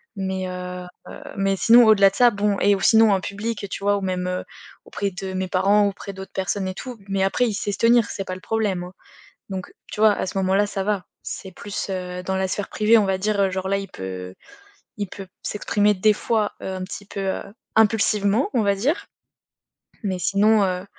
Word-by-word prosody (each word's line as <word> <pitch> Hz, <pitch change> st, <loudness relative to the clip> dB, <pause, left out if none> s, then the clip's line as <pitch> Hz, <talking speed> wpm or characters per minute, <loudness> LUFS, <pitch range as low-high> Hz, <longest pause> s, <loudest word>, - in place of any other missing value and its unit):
Mais, 190 Hz, -1 st, -3 dB
heu, 180 Hz, 0 st, -6 dB, 0.2 s
heu, -, -, -10 dB, 0.2 s
mais 195 Hz, 0 st, +1 dB
sinon 235 Hz, +4 st, +7 dB
au-delà 200 Hz, -3 st, +6 dB
de -, -, -13 dB
ça, 245 Hz, +2 st, +6 dB
bon 205 Hz, -1 st, 0 dB
et 200 Hz, 0 st, +4 dB
ou 195 Hz, -, -5 dB
sinon 225 Hz, -2 st, +6 dB
en 195 Hz, -, +3 dB
public 205 Hz, +1 st, -4 dB
tu 195 Hz, -, -6 dB
vois? 205 Hz, 0 st, +3 dB
Ou -, -, -4 dB
même, 185 Hz, -1 st, -2 dB
heu, 180 Hz, 0 st, -2 dB, 0.4 s
auprès 200 Hz, -1 st, -2 dB
de 190 Hz, +1 st, -6 dB
mes 185 Hz, 0 st, -2 dB
parents, 200 Hz, +3 st, +3 dB
auprès 200 Hz, 0 st, -6 dB
d'autres 190 Hz, 0 st, -9 dB
personnes 190 Hz, 0 st, -2 dB
et 185 Hz, -, -4 dB
tout. 250 Hz, +1 st, -7 dB
Mais 195 Hz, -1 st, +1 dB
après 240 Hz, +5 st, +2 dB
il 220 Hz, -, -2 dB
sait 205 Hz, 0 st, -2 dB
se 195 Hz, -, -6 dB
tenir, 235 Hz, 0 st, +5 dB
c'est 195 Hz, -, -5 dB
pas 185 Hz, -, -4 dB
le 185 Hz, -, -11 dB
problème, 205 Hz, -5 st, -1 dB
hein. 180 Hz, -, -10 dB, 0.6 s
Donc 190 Hz, -2 st, -6 dB, 0.2 s
tu -, -, -5 dB
vois? 215 Hz, -1 st, +6 dB
À -, -, -2 dB
ce 190 Hz, -, -6 dB
moment-là, 190 Hz, +2 st, +2 dB
ça 195 Hz, -1 st, -3 dB
va. 205 Hz, -3 st, -1 dB, 0.2 s
C'est 190 Hz, -, -7 dB
plus, 205 Hz, +3 st, -5 dB
heu, 180 Hz, -1 st, -4 dB
dans 190 Hz, 0 st, -1 dB
la 190 Hz, 0 st, 0 dB
sphère 205 Hz, +1 st, -3 dB
privée, 220 Hz, +2 st, +4 dB
on 205 Hz, -, +2 dB
va 190 Hz, 0 st, +1 dB
dire, 205 Hz, +1 st, 0 dB
heu, 195 Hz, -1 st, +3 dB
genre, 190 Hz, 0 st, -3 dB
là 195 Hz, -, +2 dB
il 195 Hz, 0 st, -6 dB
peut 95 Hz, -, -7 dB, 0.6 s
il 205 Hz, -2 st, -3 dB
peut 195 Hz, 0 st, -9 dB, 0.2 s
s'exprimer 210 Hz, 0 st, +1 dB
des 210 Hz, +3 st, +3 dB
fois, 215 Hz, 0 st, 0 dB
heu, -, -, -5 dB
un 185 Hz, -, -5 dB
petit 200 Hz, +1 st, -8 dB
peu, 200 Hz, -, -6 dB
heu, 195 Hz, -1 st, -2 dB, 0.3 s
impulsivement, 215 Hz, +1 st, +3 dB
on 235 Hz, -, +3 dB
va 200 Hz, -1 st, +2 dB
dire. 275 Hz, -, 0 dB, 1.0 s
Mais 190 Hz, -3 st, -1 dB
sinon, 205 Hz, +3 st, +3 dB
heu, 185 Hz, 0 st, -1 dB
195 Hz, 225 wpm, -23 LUFS, 190-210 Hz, 1.0 s, sinon